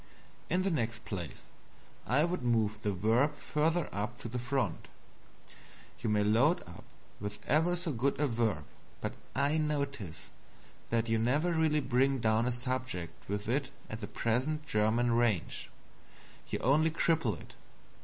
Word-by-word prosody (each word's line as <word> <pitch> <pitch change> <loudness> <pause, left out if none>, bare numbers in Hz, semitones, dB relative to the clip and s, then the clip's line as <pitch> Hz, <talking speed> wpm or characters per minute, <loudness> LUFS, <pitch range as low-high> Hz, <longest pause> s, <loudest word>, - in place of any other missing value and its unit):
In 180 +2 +2
the 195 - +1
next 115 -6 -1
place, 90 -6 -5 0.6
I 140 +5 +4
would 175 +2 -1
move 110 -3 +1
the 105 - 0
Verb 115 - +2
further 160 +3 0
up 110 +4 -3
to - - -5
the 125 +2 -3
front. 125 -6 -1 1.1
You 115 - -1
may 105 -1 +3
load 120 - +4
up 85 - -12 0.3
with 105 0 -4
ever 165 +4 +3
so 175 -2 -2
good 135 +3 0
a 150 - +3
Verb, 115 - 0 0.3
but - - -3 0.2
I 140 +4 +2
notice 140 - -3 0.6
that 115 0 +1
you 115 0 +2
never 145 +10 +2
really 160 -2 +3
bring 135 +1 +2
down 115 0 +2
a - - +2
subject 125 -10 -4
with 100 +1 -2
it 135 +3 0 0.2
at 110 - -4
the 100 - -4
present 130 +10 0
German 115 -1 +2
range 115 -6 +1 0.8
you - - -1
only 150 +6 +4
cripple 160 - +1
it. - - -13
120 Hz, 155 wpm, -32 LUFS, 110-150 Hz, 1.1 s, I